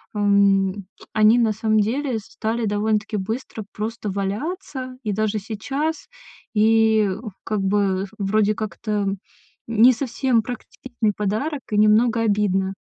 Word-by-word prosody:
ам, 200 -1 +2 0.3
они 215 +1 +5
на 230 -2 +3
самом 215 0 +1
деле 250 +4 -1
стали 225 +2 -3
довольно-таки 210 +1 0
быстро 220 +3 -4
просто 215 0 -4
валяться, 255 - -4
и 215 - -1
даже 215 +1 0
сейчас. 270 +10 -3 0.5
И 220 -1 +4 0.3
как 215 -2 -2
бы 195 -1 +1
вроде 210 +1 +1
как-то, 215 0 -5
м, 200 -2 -1 0.5
не 230 +2 +6
совсем 250 -1 0
практиктичный 240 -1 -4
подарок 240 +9 -2
и 210 - +1
немного 220 +2 +4
обидно. 200 -3 +1
215 Hz, 120 wpm, -22 LUFS, 205-230 Hz, 0.5 s, не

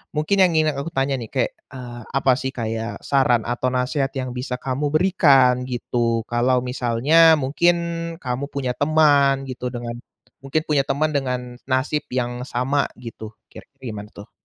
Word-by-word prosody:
mungkin 155 +6 +2
yang 185 - +6
ingin 155 -1 +3
aku 140 +4 -4
tanya 135 -2 0
nih 115 -2 -7
kayak, 130 -3 0 0.2
eee, 120 -2 -8
apa 135 -1 +2
sih 130 - -2
kayak 115 -2 -4
saran 125 -5 +2
atau 120 +1 -1
nasehat 130 +2 0
yang 130 -1 -3
bisa 125 0 -4
kamu 135 +3 -2
berikan 140 -7 +4
gitu? 115 -2 -1
Kalau 120 +2 +2
misalnya 135 +7 +4
mungkin 150 +6 +2 0.5
kamu 125 +2 -2
punya 130 -3 -2
teman 145 -2 +3
gitu 125 0 -4
dengan 120 -1 -5 0.5
mungkin 135 +3 0
punya 145 -3 +2
teman 155 +2 0
dengan 125 -3 -2
nasib 130 +3 0
yang 125 -1 -2
sama 135 +3 0
gitu, 110 -2 -9 0.2
kira-kira 135 - -15
gimana 105 0 -8
tuh? 100 - -12
130 Hz, 160 wpm, -22 LUFS, 125-145 Hz, 0.5 s, yang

